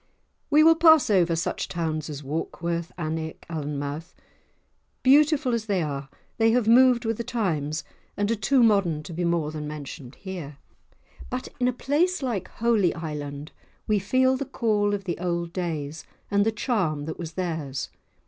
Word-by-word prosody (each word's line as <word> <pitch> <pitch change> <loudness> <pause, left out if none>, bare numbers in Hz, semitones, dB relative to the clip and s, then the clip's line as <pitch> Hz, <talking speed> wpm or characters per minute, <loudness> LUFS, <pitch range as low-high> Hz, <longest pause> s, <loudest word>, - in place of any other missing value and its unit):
We 300 +1 +6
will 325 +1 +8
pass 320 -6 +6
over 175 -4 +3
such 165 - -2
towns 160 -3 -3
as 145 -1 -6
Warkworth, 170 +3 -3
Alnwick, 160 -1 -4
Alnmouth; 150 +1 -4 0.9
beautiful 285 -1 +4
as 225 -1 -2
they 195 -5 +1
are, 140 -2 -4 0.3
they 225 0 +5
have 240 -3 +2
moved 245 0 +6
with 225 -1 0
the 235 - -3
times 165 - -1 0.3
and 205 +2 +1
are - - +2
too 245 +5 +3
modern 195 -9 +3
to 170 - -8
be 175 +2 -2
more 170 -3 0
than 150 -1 -5
mentioned 145 -3 -8
here. 175 -8 -7 0.7
But 250 0 -4
in 250 - +2
a - - +3
place 295 +7 0
like 220 -8 -2
Holy 225 -6 +1
Island 150 -2 -6 0.3
we 210 -1 +2
feel 260 +6 +2
the 280 - -3
call 210 -5 +1
of 200 - -6
the 175 -3 -3
old 170 -1 -2
days, 160 -4 -3 0.3
and 200 +1 +3
the - - +3
charm 185 - -1
that 160 - -6
was 165 -2 -6
theirs. 160 -7 -3
180 Hz, 165 wpm, -25 LUFS, 155-235 Hz, 0.9 s, will